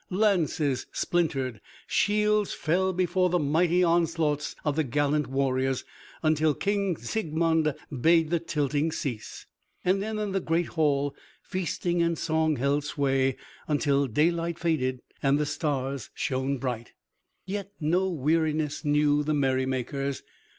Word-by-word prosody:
Lances 175 - +1
splintered, 135 -10 -1 0.2
shields 210 0 +2
fell 185 +4 +1
before 180 0 +1
the 180 - +2
mighty 170 +4 +2
onslaughts 165 -3 +1
of 150 -2 +1
the 160 - +2
gallant 145 +2 +1
warriors, 135 -1 0 0.4
until 155 -1 +3
King 200 -4 0
Siegmund 160 - 0 0.3
bade 165 0 +4
the 170 - +2
tilting 150 -1 0
cease. 135 -8 -5 0.4
Then 200 +4 +1
in 210 -2 -2
the 195 - +1
great 170 -1 0
hall 145 -3 +1 0.3
feasting 175 -2 -1
and 170 -1 +1
song 160 -1 +1
held 140 +2 +1
sway 135 -3 +1 0.3
until 140 -2 +2
daylight 165 +6 +1
faded 130 -7 -1 0.2
and 140 0 +3
the 150 - 0
stars 140 -4 -2
shone 135 +1 -1
bright. 125 -3 -4 0.5
Yet 200 +1 -4
no 180 +5 +1
weariness 155 -1 0
knew 150 0 +3
the 150 +1 0
merrymakers. 130 0 -1
155 Hz, 125 wpm, -27 LUFS, 140-170 Hz, 0.5 s, bade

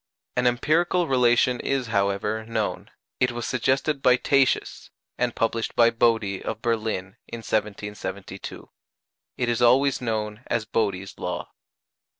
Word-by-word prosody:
An 125 0 +2
empirical 165 +8 +2
relation 125 -1 +3
is, 135 -2 -1
however, 100 0 0
known: 110 -2 -2 0.3
it 125 -1 +2
was 120 0 -4
suggested 135 +3 0
by 125 -1 +6
Tatius, 135 0 +1 0.3
and 120 -1 0
published 115 0 -1
by 115 0 +5
Bode, 115 -5 +1
of 110 - -4
Berlin, 110 -3 -2
in 115 - -7
1772. 100 -3 -4 0.7
It 125 - 0
is 120 0 0
always 130 +3 +4
known 110 -2 -2
as 115 -2 -1
Bode's 100 -4 -2
law. - - -4
115 Hz, 130 wpm, -25 LUFS, 105-125 Hz, 0.7 s, by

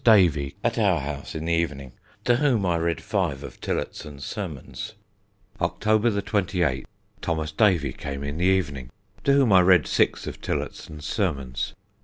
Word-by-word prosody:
Davey, 85 - +5
at - - +1
our - - +3
house 70 0 -5
in 80 0 -3
the 85 - +1
evening, 75 -6 -1 0.3
to 120 -1 +4
whom 125 -8 +2
I 85 -2 +2
read 85 0 0
five 95 - -1
of - - -10
Tillotson's 70 -2 -4
Sermons. 100 - -6 0.6
"Sunday, - - +2
October 110 +2 +2
28th, 90 - 0 0.4
Thos. 80 -2 -1
Davey 80 - +3
came 70 -1 -5
in 70 +3 -4
the 90 - +2
evening 75 -9 +1 0.4
to 140 - +5
whom 135 -7 +5
I 95 - +8
read 90 -5 +5
six - - +1
of - - -7
Tillotson's 75 -1 -4
sermons. 70 - -2
85 Hz, 160 wpm, -25 LUFS, 70-100 Hz, 0.6 s, I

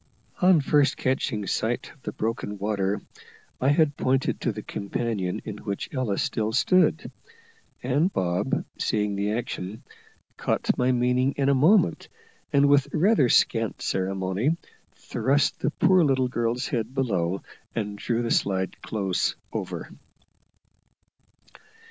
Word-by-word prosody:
On 180 -3 +6
first 145 -1 +2
catching 130 -5 -1
sight 110 +5 -2
of 145 - -26
the - - -5
broken 110 -2 -3
water, 100 0 -1 0.6
I 130 - +1
had 145 -1 +3
pointed 130 -1 0
to 120 - 0
the 105 0 -7
companion 100 -3 -3
in - - -5
which 100 +7 -5
Ella 125 -7 -1
still 110 0 -1
stood; 170 - +2 0.7
and 145 +9 +2
Bob, 95 - -1
seeing 105 -2 0
the 100 +1 -1
action, 110 -3 -4 0.5
caught - - 0
my 125 +1 +2
meaning 125 +2 +2
in 140 -1 +1
a - - +5
moment, 155 - +3 0.4
and 140 0 +4
with 140 -1 +4
rather 175 - +3
scant 115 -1 +2
ceremony, 95 - 0 0.4
thrust 140 +2 0
the - - 0
poor 185 +3 +4
little 130 -3 +2
girl's 120 +1 -1
head 120 -2 -3
below 95 -8 0 0.3
and 105 -2 -3
drew 120 +1 -1
the 115 - -2
slide 95 -1 0
close 95 -4 -1 0.2
over. - - -5
120 Hz, 130 wpm, -25 LUFS, 100-140 Hz, 0.7 s, On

